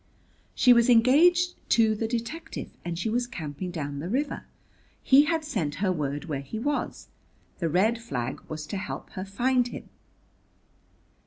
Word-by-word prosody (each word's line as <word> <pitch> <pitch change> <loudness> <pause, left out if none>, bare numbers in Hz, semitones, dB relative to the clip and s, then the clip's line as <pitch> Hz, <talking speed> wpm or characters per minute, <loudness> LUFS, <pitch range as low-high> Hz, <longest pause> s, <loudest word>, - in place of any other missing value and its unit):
"She 250 - +6
was 235 0 +4
engaged 330 +10 +5 0.2
to 220 -2 +4
the 220 +1 -2
detective, 235 +7 -5
and 170 -1 -4
she 175 - -2
was 240 +2 0
camping 165 - -6
down 145 -5 -4
the 165 +5 -5
river. 280 +7 -2 0.6
He 275 +2 +6
had 320 0 0
sent 165 - -2
her 190 +2 0
word 145 -3 -3
where 145 -5 -3
he 140 +10 -7
was. 290 +6 -3 0.5
The 165 -3 0
red 215 +8 +2
flag 130 - -4
was 155 -1 -5
to 200 - -4
help 195 - -6
her 185 - -5
find 245 +5 +1
him." - - -9
220 Hz, 160 wpm, -27 LUFS, 165-250 Hz, 0.6 s, She